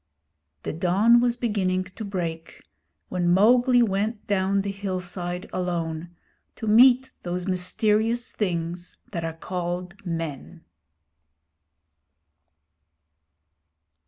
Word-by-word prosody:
The - - -3
dawn 195 +8 +4
was 240 -1 +1
beginning 190 -6 0
to 185 +4 -9
break 170 -5 -5 0.5
when 175 -1 0
Mowgli 240 +6 +5
went 210 +1 -1
down 195 0 +1
the 200 - -2
hillside 180 -2 -4
alone, 170 -2 -2 0.5
to - - -6
meet 250 +4 +5
those 180 0 -3
mysterious 215 +5 +1
things 175 -3 -3
that 170 -4 -3
are 165 0 -4
called 180 +2 -5
men. 165 -1 -5
185 Hz, 95 wpm, -25 LUFS, 175-215 Hz, 0.5 s, Mowgli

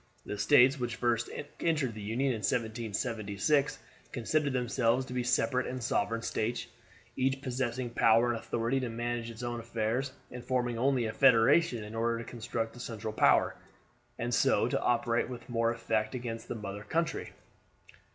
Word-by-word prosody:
The 105 - -5
States 135 +4 +5
which 120 -1 -2
first 120 -1 0 0.3
entered 150 -8 +1
the 110 - -8
Union 115 +7 0
in 115 - -2
1776 110 +4 0 0.3
considered 140 +4 0
themselves 125 0 +1
to 125 - -8
be 125 - 0
separate 125 +1 +1
and 130 -1 -4
sovereign 115 0 0
States, 115 +3 -2 0.5
each 135 +1 +1
possessing 125 -1 -2
power 115 +1 +4
and 115 - -2
authority 120 +5 -1
to 125 -2 -3
manage 120 0 -3
its 115 +1 -8
own 120 0 -3
affairs, 115 +3 -2 0.2
and 125 -1 -7
forming 120 -2 -1
only 130 -1 +2
a 110 - -3
federation 125 0 +4
in 105 +1 -9
order 115 +1 0
to 115 - -5
construct 115 -1 -4
a - - -11
central 110 -3 -5
power, - - +4 0.6
and 120 +1 -2
so - - +3
to - - -1
operate 120 0 +1
with 120 -2 -8
more 115 -1 +1
effect 110 -1 -1
against 115 -2 -5
the - - -4
mother 100 -2 -6
country. 165 +9 -2
120 Hz, 165 wpm, -31 LUFS, 115-125 Hz, 0.6 s, States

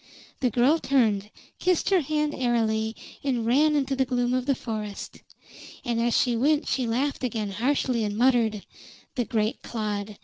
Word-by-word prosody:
The 255 - +2
girl 255 +8 +3
turned, 215 -9 +1 0.3
kissed 365 +1 +1
her 375 -3 +5
hand 300 +1 -1
airily, 225 -3 0 0.3
and 250 -5 0
ran 295 +6 +4
into 275 -1 0
the 265 - +2
gloom 245 -1 0
of 255 +1 -1
the 275 - +3
forest. 215 -4 -6 0.7
And 235 -2 0
as 235 0 +2
she 245 -2 +2
went 290 +6 +2
she 255 -3 0
laughed 265 +5 -1
again 220 -4 -2
harshly 245 +2 0
and 205 0 -2
muttered: 230 -4 +2 0.5
"The 245 - -1
great 220 -2 -1
clod! 210 -2 -4
240 Hz, 165 wpm, -26 LUFS, 220-270 Hz, 0.7 s, her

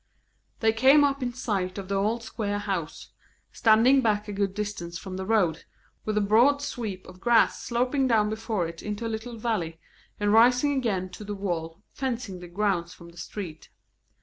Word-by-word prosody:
They 220 -1 +3
came 265 +6 +6
up 280 -1 +1
in 245 -1 -1
sight 200 -7 -2
of 195 -2 -6
the 200 - -3
old 215 +4 0
square 210 -2 -3
house, 195 -6 -4 0.4
standing 235 +5 +5
back 210 -3 +1
a 205 - -5
good 195 -1 -1
distance 200 -5 -4
from 185 +1 -7
the 190 0 -5
road, 180 -8 +1 0.4
with 215 -1 -1
a - - +3
broad 235 +8 +4
sweep 220 -9 -5
of 185 0 -13
grass 235 +2 +3
sloping 255 +3 0
down 220 -4 +3
before 220 -5 -2
it 165 0 -9
into 210 +2 -4
a 225 - -2
little 230 +2 -6
valley, 195 -8 -2 0.4
and 205 0 +2
rising 250 +5 +5
again 205 -9 -1
to 195 - -10
the 205 0 -5
wall 175 -2 -4
fencing 240 -8 -3
the 175 - -9
grounds 175 -2 -1
from 170 -1 -13
the 170 - -18
street. 170 -2 -7
210 Hz, 185 wpm, -26 LUFS, 185-235 Hz, 0.4 s, came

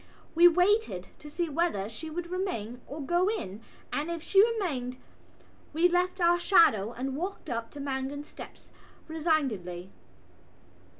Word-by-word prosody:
We 340 +2 +8
waited 360 - +2
to 300 - -10
see 340 +3 -2
whether 300 - 0
she 230 +9 -8
would 345 +2 -5
remain 250 - -3
or 295 +2 -6
go 350 +5 +2
in 225 - -4 0.3
and, 300 +3 -1
if 335 -2 -4
she 390 +3 +5
remained, 315 - -1 0.8
we 330 +3 +4
left 360 +1 0
our 345 0 +4
shadow 230 - +4
and 260 +2 -4
walked 360 -1 -5
up 230 -1 -3
to 290 - -9
Mangan's 275 +1 -3
steps - - -12 0.4
resignedly. 255 - -1
315 Hz, 140 wpm, -29 LUFS, 250-350 Hz, 0.8 s, We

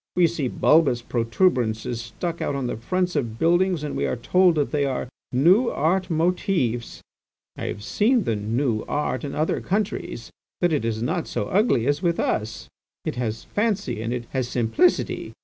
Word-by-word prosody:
We 180 -1 +5
see 155 -5 -1
bulbous 135 -3 +3
protuberances 115 - 0
stuck 165 +9 -5
on 140 -2 -1
the 120 - -2
fronts 180 +10 -1
of 120 -6 -2
buildings 175 +1 +2
and 150 - -4
we 70 - 0
are 65 - -1
told 180 -2 +3
they 150 -1 0
are 130 -2 -2 0.2
'new 180 - +4
art' 185 +5 0
motives. 160 - 0 0.5
I - - -5
have 105 - -5
seen 225 - +2
the 115 - 0
'new 110 +2 -1
art' 130 -4 -1
in 140 - -4
other 155 +1 0
countries, 195 - -3 0.3
but 175 -2 +2
it 145 - 0
is 115 -1 -2
not 165 +7 -1
so - - -3
ugly 185 - +2
as 145 +2 +1
with 170 -2 0
us; 110 +1 -2 0.4
it - - -1
has 115 -3 -3
fancy 200 - -1
and 115 +1 -3
it 120 -1 -3
has 130 -2 -1
simplicity. 125 - +1
145 Hz, 170 wpm, -24 LUFS, 115-180 Hz, 0.5 s, We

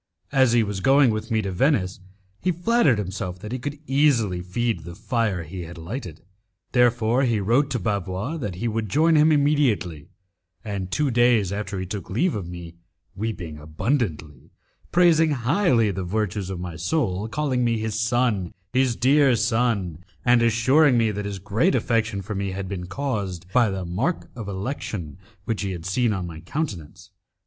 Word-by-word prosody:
As 130 -3 +4
he 120 -1 +4
was 100 -2 -3
going 135 +4 +5
with 110 +2 -4
me 110 -2 +1
to 100 - -3
Venice, 95 - +1 0.4
he 185 - +1
flattered 175 - +2
himself 95 -2 -4
that 105 +4 -8
he 130 - -3
could 145 +4 -5
easily 130 -10 +2
feed 110 +3 -1
the 85 0 -9
fire 110 -7 -1
he 90 +4 -7
had 85 0 -8
lighted. 85 - -7 0.5
Therefore 120 0 +3
he 120 -5 +2
wrote 120 +8 +2
to 130 - -1
Bavois 100 - -2
that 105 - -4
he 115 +6 -3
would 110 -1 -2
join 160 - +3
him 155 +1 +5
immediately, 140 - +1 0.6
and 100 -3 -4
two 145 +7 0
days 120 -5 +3
after 100 -1 -4
he 95 - -3
took 100 +2 -6
leave 145 - +1
of 95 -5 -4
me, 85 -1 -9 0.4
weeping 90 -7 -4
abundantly, 80 - -3 0.4
praising 165 -3 +4
highly 130 - +2
the 95 0 -4
virtues 100 0 -2
of 95 -2 -4
my 90 -2 -5
soul, 100 - -1
calling 130 0 0
me 115 -1 +1
his 110 0 -2
son, 115 -6 0 0.2
his 130 -2 +2
dear 135 +1 +4
son, 115 -8 0 0.2
and 120 -1 +5
assuring 125 +5 +4
me 115 -2 +2
that 105 0 -4
his 100 -1 -4
great 110 - +1
affection 110 -4 0
for 105 - -5
me 100 -1 -2
had 95 0 -4
been 90 -2 -5
caused 100 -7 -3
by 120 -3 +4
the 95 -2 -3
mark 110 - -2
of 115 -4 -6
election 95 - -5 0.3
which 115 -3 -2
he 100 - -2
had 85 -3 -6
seen 115 +5 +1
on 95 -3 -2
my 80 -2 -8
countenance. 90 - -5
110 Hz, 175 wpm, -24 LUFS, 95-130 Hz, 0.6 s, going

